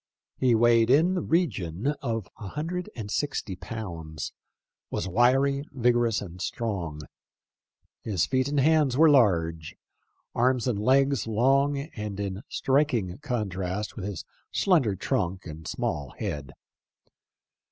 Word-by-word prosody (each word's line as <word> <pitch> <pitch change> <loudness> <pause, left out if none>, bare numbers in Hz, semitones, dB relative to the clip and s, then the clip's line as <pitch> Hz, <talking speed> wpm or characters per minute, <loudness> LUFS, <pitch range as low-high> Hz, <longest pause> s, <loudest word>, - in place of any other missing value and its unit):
He 125 -3 +4
weighed 115 0 +4
in 160 +8 +5
the 180 - 0
region 125 - 0
of 115 -6 -2
a 105 - -6
hundred 165 - -4
and 105 -3 -6
sixty 135 -9 -2
pounds; 85 -8 -6 0.6
was 95 - -3
wiry, 135 +7 +3
vigorous, 120 -4 +2
and 90 -1 -9
strong. 95 -9 -3 1.0
His 95 -8 0
feet 130 0 +1
and 145 0 0
hands 145 -3 +3
were 160 0 +7
large/ 85 - +2 0.6
arms 125 +1 +2
and 115 -5 0
legs 135 +3 +3
long 135 +6 +3
and 105 - -6
in 100 -1 -3
striking 130 -9 +1
contrast 105 -7 -3
with 100 - -5
his 100 -5 -5 0.3
slender 150 - +2
trunk 95 -4 -2
and 80 -1 -8
small 70 -3 -3
head. 70 -2 -4
115 Hz, 125 wpm, -27 LUFS, 95-140 Hz, 1.0 s, were